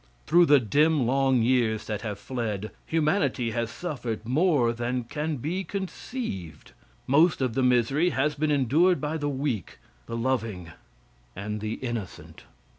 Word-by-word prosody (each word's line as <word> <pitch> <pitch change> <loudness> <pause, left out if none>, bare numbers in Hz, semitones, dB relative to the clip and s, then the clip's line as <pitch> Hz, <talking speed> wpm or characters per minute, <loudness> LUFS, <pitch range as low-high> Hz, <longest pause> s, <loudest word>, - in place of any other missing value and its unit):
Through 170 +2 +5
the 145 -1 +7
dim 145 +5 +2
long 130 -1 +2
years 115 -3 +1
that 105 -2 -3
have 105 -3 -4
fled, 110 -2 -4 0.2
humanity 155 - +1
has 115 0 -2
suffered 120 -7 -5
more 140 -4 +3
than 120 +1 -2
can 150 +6 -3
be 170 +10 -3
conceived. 190 - -6 0.3
Most 155 +5 +4
of 130 -4 0
the 130 - 0
misery 125 +7 +3
has 150 -1 0
been 150 +2 -1
endured 150 +6 +3
by 155 +2 -2
the 145 -1 -2
weak, 130 - -3 0.3
the 115 - -4
loving 115 -9 -2 0.6
and 105 +2 -4
the 110 0 -2
innocent. 120 -7 -6
130 Hz, 145 wpm, -26 LUFS, 115-150 Hz, 0.6 s, the